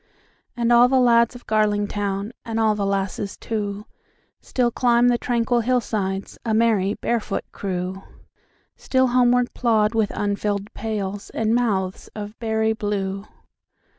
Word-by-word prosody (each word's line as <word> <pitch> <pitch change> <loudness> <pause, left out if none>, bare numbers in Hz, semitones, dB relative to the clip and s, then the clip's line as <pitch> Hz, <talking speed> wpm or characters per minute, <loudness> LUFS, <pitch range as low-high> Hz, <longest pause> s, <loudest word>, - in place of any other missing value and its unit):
And 240 0 +2
all 240 +1 +7
the 260 +1 +3
lads 235 -1 +4
of 245 - -12
Garlingtown, 205 -1 0
And 225 -2 -3
all 220 -1 +3
the 205 -1 -1
lasses 195 0 -2
too, 210 -2 -4 0.6
Still 245 -2 0
climb 240 0 +3
the 240 - +3
tranquil 240 0 +1
hillsides,A 220 -3 -1
merry, 215 -3 +2
barefoot 225 -4 -2
crew; 185 0 -4 0.7
Still 260 -1 +1
homeward 245 0 +3
plod 220 -3 +2
with 220 -3 +1
unfilled 205 0 -2
pailsAnd 210 0 -3
mouths 200 -6 0
of 210 0 -7
berry 220 -1 +1
blue. 200 -2 -3
220 Hz, 125 wpm, -22 LUFS, 200-235 Hz, 0.7 s, all